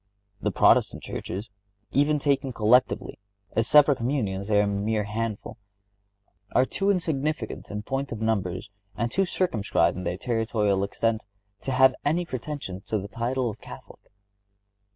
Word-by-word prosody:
The - - +1
Protestant - - +3
churches, 100 +5 -5 0.4
even 145 +3 +3
taken 140 -2 0
collectively, 115 +2 +2 0.3
(as 115 0 +1
separate 145 -2 +6
communions 110 -6 -1
they 105 -1 +3
are - - +4
a - - 0
mere 105 +2 0
handful) 110 +1 -4 1.0
are 130 - +5
too 195 +8 -1
insignificant 155 - -1
in 105 0 -5
point 135 +2 -3
of 115 - -4
numbers, 100 -3 -1 0.2
and 115 +3 -1
too 195 +7 +2
circumscribed 150 - +1
in 90 - -5
their 90 0 -2
territorial 110 -4 0
extent, 110 +2 -1 0.4
to 135 - -3
have 130 0 +5
any 165 +5 +1
pretensions 130 - -6
to 110 - -1
the 100 0 -5
title 120 +4 -1
of 110 - -6
Catholic. - - -11
115 Hz, 150 wpm, -26 LUFS, 105-135 Hz, 1.0 s, separate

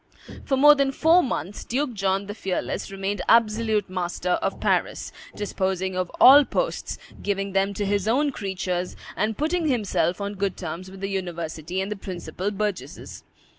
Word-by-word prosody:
For 270 - +1
more 295 +2 +8
than 275 -2 +1
four 325 +5 +5
months, 200 - -3
Duke 265 +1 -1
John 195 -1 0
the 205 - -6
Fearless 195 -4 -3
remained 195 +1 -3
absolute 220 -2 +3
master 180 -1 -3
of - - -2
Paris, - - 0 0.2
disposing 190 -2 -2
of 185 -1 -1
all 285 +3 +9
posts, - - -2 0.2
giving 195 -1 -1
them 195 +1 +1
to 205 - -1
his 200 0 0
own 280 +6 +2
creatures, 185 -4 -3 0.2
and 215 0 -1
putting 320 +2 0
himself 210 -8 0
on 200 0 -3
good 195 -2 -2
terms 175 +2 -6
with 190 0 -12
the 195 - -1
university 175 -2 -3
and 195 +2 -4
the - - -1
principal 185 0 -5
burgesses. 200 -9 -4
200 Hz, 165 wpm, -24 LUFS, 185-225 Hz, 0.2 s, all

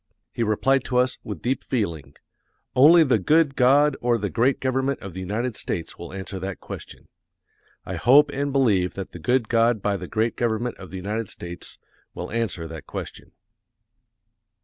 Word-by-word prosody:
He - - -4
replied 120 +5 +2
to 125 - -1
us, 125 0 +1
with 105 -7 -7
deep 130 +2 -1
feeling, 85 - -3 0.6
"Only 160 +6 +8
the 130 -7 +2
good 150 - +3
God 140 +3 +4
or 120 -1 +2
the 100 -3 -3
great 125 +4 +2
government 130 +1 0
of 95 -3 -8
the 95 - -7
United 105 +6 -2
States 85 -2 -4
will 85 - -8
answer 95 0 -6
that 95 +1 -5
question." - - -10 0.8
I - - -4
hope 145 +4 +5
and 140 0 -2
believe 105 -10 +2
that 95 -2 -6
the 90 - -9
good 120 +7 +1
God 115 0 +3
by 100 0 0
the 90 -1 -7
great 110 +3 0
government 120 +1 -1
of 90 - -10
the 95 - -7
United 105 +3 -3
States 85 0 -8 0.4
will 90 - -6
answer 105 -8 -2
that 80 -1 -9
question. - - -8
115 Hz, 175 wpm, -24 LUFS, 95-130 Hz, 0.8 s, Only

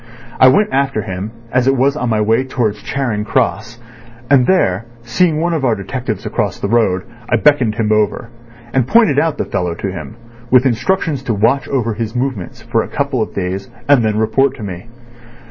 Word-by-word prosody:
I 130 - +8
went 145 +7 +3
after 135 -5 0
him, 95 +2 -5 0.2
as 130 0 +1
it 135 0 +3
was 135 +3 +2
on 125 -5 -2
my 110 -2 +1
way 115 +4 +2
towards 115 -5 -2
Charing 120 -7 -2
Cross, 115 -1 -1 0.5
and 130 -3 +5
there 115 - +1 0.2
seeing 155 +6 +1
one 170 +1 0
of 155 -4 -1
our 120 -4 +2
detectives 110 +1 -5
across - - -2
the - - -2
road, 100 -6 +1 0.3
I - - +3
beckoned 125 -5 +3
him 110 -2 0
over, 110 +2 0 0.4
and 130 -2 +1
pointed 210 -11 +4
out 155 -1 0
the - - -2
fellow 90 -2 -2
to 95 +2 -4
him, 90 +4 -8 0.3
with 125 +1 +5
instructions 145 - 0
to 120 -5 -2
watch 120 +6 +1 0.3
his 115 0 -4
movements 120 -3 -3
for 115 0 0
a - - -5
couple 140 -4 -1
of 110 - -4
days, 95 +1 -3 0.2
and 140 -4 +5
then 110 -1 0
report 135 +5 +2
to 115 - -9
me. 95 +1 -7
120 Hz, 195 wpm, -16 LUFS, 105-135 Hz, 0.5 s, I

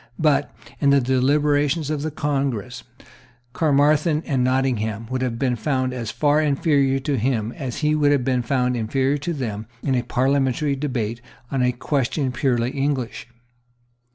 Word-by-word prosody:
But, 145 -3 +2 0.3
in 140 - +3
the 140 0 +5
deliberations 145 +4 +1
of 150 -2 -2
the 155 - -2
Congress, 135 -5 -2 0.7
Caermarthen 150 +2 +2
and 135 -4 0
Nottingham 120 -4 0
would 130 0 -1
have 125 -3 -1
been 125 -1 0
found 130 +2 -1
as 120 -4 -4
far 150 +4 +2
inferior 140 -2 +2
to 140 0 -1
him 115 -2 0
as 130 -1 -5
he 150 - +3
would 145 -1 +3
have 140 -4 +1
been 130 -2 +1
found 125 0 0
inferior 130 +5 0
to 150 +5 -3
them 110 -8 -4 0.2
in 135 - 0
a 125 - +2
parliamentary 135 +2 +1
debate 120 -5 -3 0.3
on 135 -2 0
a 125 0 +3
question 135 +1 -1
purely 125 -1 0
English. 135 -5 -2
135 Hz, 155 wpm, -22 LUFS, 125-145 Hz, 0.7 s, the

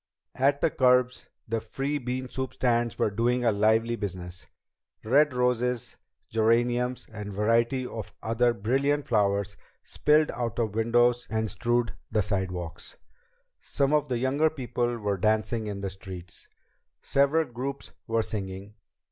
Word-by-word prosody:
At 140 +2 +2
the - - +3
curbs 125 -1 +2 0.2
the 115 0 -1
free 135 +6 -3
bean 130 0 -3
soup 130 0 -4
stands 120 -2 +1
were 105 - +1
doing 120 +3 +1
a 115 - +5
lively 110 +3 +2
business. 90 -4 -6 0.6
Red 145 +6 +4
roses, 125 -1 0 0.3
geraniums, 120 +3 +1
and 105 -1 -6
varieties 115 +5 +1
of 110 -3 -7
other 115 +2 +2
brilliant 135 +7 0
flowers 100 -2 +1 0.3
spilled 150 +1 +2
out 120 -2 -3
of 110 -4 0
windows 120 +2 +2
and 110 -1 -1
strewed 120 -1 0 0.2
the 105 - +2
sidewalks. 90 -4 -4 0.6
Some 140 +1 0
of 150 -1 +2
the 125 - 0
younger 135 +6 +2
people 120 -4 -2
were 105 -3 -1
dancing 110 +2 0
in 100 -1 -4
the 100 -1 -3
streets. 95 -1 -10 0.6
Several 140 +4 +3
groups 135 +2 -6 0.2
were 115 -1 +1
singing. 100 -1 -5
120 Hz, 140 wpm, -27 LUFS, 105-125 Hz, 0.6 s, a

